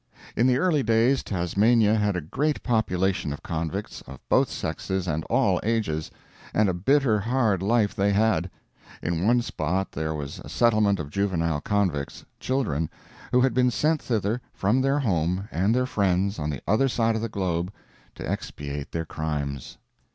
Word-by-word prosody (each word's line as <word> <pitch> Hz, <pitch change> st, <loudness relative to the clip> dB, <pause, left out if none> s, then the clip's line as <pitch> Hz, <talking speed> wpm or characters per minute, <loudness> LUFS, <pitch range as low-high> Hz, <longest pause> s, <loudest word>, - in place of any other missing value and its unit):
In 120 Hz, -, +3 dB
the 125 Hz, -1 st, +3 dB
early 155 Hz, -1 st, +2 dB
days 115 Hz, +3 st, +3 dB
Tasmania 105 Hz, +5 st, +2 dB
had 105 Hz, -3 st, +1 dB
a 90 Hz, -, -1 dB
great 145 Hz, -, -1 dB
population 95 Hz, -, 0 dB
of 70 Hz, -, -7 dB
convicts, 85 Hz, +5 st, -4 dB
of 65 Hz, 0 st, -10 dB
both -, -, +4 dB
sexes 95 Hz, -1 st, -3 dB
and 80 Hz, -1 st, -1 dB
all -, -, +2 dB
ages, 105 Hz, -9 st, -1 dB, 0.5 s
and 105 Hz, -1 st, +4 dB
a 95 Hz, -, +1 dB
bitter 115 Hz, +4 st, +2 dB
hard 110 Hz, -3 st, +1 dB
life 105 Hz, +1 st, +2 dB
they 100 Hz, +1 st, +1 dB
had. 100 Hz, -4 st, +2 dB, 0.5 s
In 85 Hz, +3 st, 0 dB
one 120 Hz, +1 st, +4 dB
spot 95 Hz, -4 st, -2 dB
there 80 Hz, 0 st, -3 dB
was 70 Hz, -2 st, -6 dB
a -, -, -10 dB
settlement 105 Hz, -4 st, +3 dB
of 75 Hz, -1 st, -6 dB
juvenile 85 Hz, -6 st, 0 dB
convicts 95 Hz, -9 st, -1 dB
children 105 Hz, -, -1 dB, 0.4 s
who 125 Hz, -, +4 dB
had 130 Hz, -2 st, +3 dB
been 125 Hz, +1 st, +3 dB
sent 155 Hz, +5 st, +1 dB
thither 110 Hz, 0 st, -1 dB
from 105 Hz, +7 st, +2 dB
their 135 Hz, +2 st, +2 dB
home 95 Hz, -, 0 dB
and 95 Hz, +7 st, +1 dB
their 125 Hz, 0 st, +2 dB
friends 100 Hz, -4 st, 0 dB
on 75 Hz, 0 st, -2 dB
the 70 Hz, -4 st, -4 dB
other 110 Hz, +7 st, +3 dB
side 115 Hz, -3 st, +1 dB
of 110 Hz, -, -2 dB
the 115 Hz, -, -2 dB
globe 90 Hz, -3 st, -2 dB, 0.4 s
to -, -, -6 dB
expiate 70 Hz, 0 st, -5 dB
their 80 Hz, -1 st, -2 dB
"crimes." 75 Hz, -4 st, -4 dB
100 Hz, 170 wpm, -25 LUFS, 85-115 Hz, 0.5 s, both